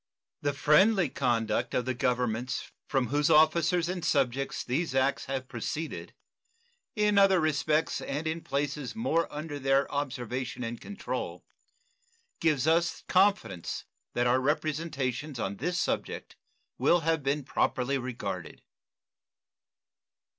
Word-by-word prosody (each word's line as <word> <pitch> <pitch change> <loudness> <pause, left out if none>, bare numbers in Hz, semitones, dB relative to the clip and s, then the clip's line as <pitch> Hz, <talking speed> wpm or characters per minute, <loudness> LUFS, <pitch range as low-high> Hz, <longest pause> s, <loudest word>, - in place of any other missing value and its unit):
The 145 0 0
friendly 165 +5 +4
conduct 120 -2 0
of 125 - +1
the 130 - 0
Governments 125 0 -1 0.2
from 130 -4 0
whose 145 +3 +2
officers 170 +2 +4
and 180 -1 -3
subjects 135 -1 0
these 135 +2 -1
acts 135 +1 +1
have 135 -1 -3
proceeded, 150 +7 -5 0.8
in 210 -2 +3
other 195 -2 +6
respects 155 0 +1
and 145 +3 -3
in 160 +1 -2
places 140 - -2
more 170 -8 0
under 150 -1 -5
their 135 +1 +3
observation 130 -3 -3
and 115 0 -5
control, 205 0 -5 0.9
gives 150 -5 +2
us 170 +2 +2
confidence 190 - +1 0.3
that 120 - +2
our 125 +1 +4
representations 145 -2 -1
on 100 -1 -2
this 175 - -1
subject - - -2 0.4
will 175 0 +4
have 165 -1 +1
been 140 +2 0
properly 130 +1 0
regarded. 105 -8 -5
140 Hz, 120 wpm, -29 LUFS, 125-160 Hz, 0.9 s, other